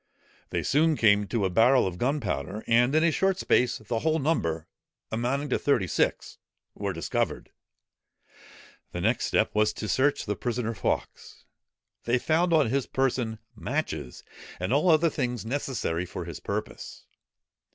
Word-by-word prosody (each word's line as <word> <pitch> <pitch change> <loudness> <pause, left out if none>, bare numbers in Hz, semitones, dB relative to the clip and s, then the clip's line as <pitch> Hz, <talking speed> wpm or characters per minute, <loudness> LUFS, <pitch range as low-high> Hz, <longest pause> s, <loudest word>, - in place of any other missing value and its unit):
They - - -2
soon 155 +2 +2
came 105 -2 +4
to 110 -2 0
a 95 - 0
barrel 120 +6 +5
of 90 -2 -4
gunpowder: 110 - -2
and 120 +4 +3
in 155 - +4
a 170 - +4
short 190 +3 +1
space, 125 -9 +2
the 110 +1 -3
whole 160 +3 +1
number, 85 - 0 0.5
amounting 130 +6 -1
to - - +1
thirty 140 -9 +2
six, 85 - -1 0.3
were - - -3
discovered. - - -2 1.4
The 90 - -3
next 110 +5 +1
step 110 - +1
was 105 0 +2
to 110 - -5
search 130 +9 +1
the 105 - -2
prisoner 120 0 -2
Fawkes. 95 - -4 0.6
They 120 +2 +2
found 165 +7 +1
on 150 -8 +3
his 135 -1 0
person 125 -4 -1 0.2
matches, 60 - -4 0.4
and 90 +7 -1
all 150 +6 +3
other 160 0 +4
things 125 -5 -3
necessary 115 -9 -2
for 90 0 -6
his 85 -3 -7
purpose. - - -6
120 Hz, 150 wpm, -27 LUFS, 105-145 Hz, 1.4 s, barrel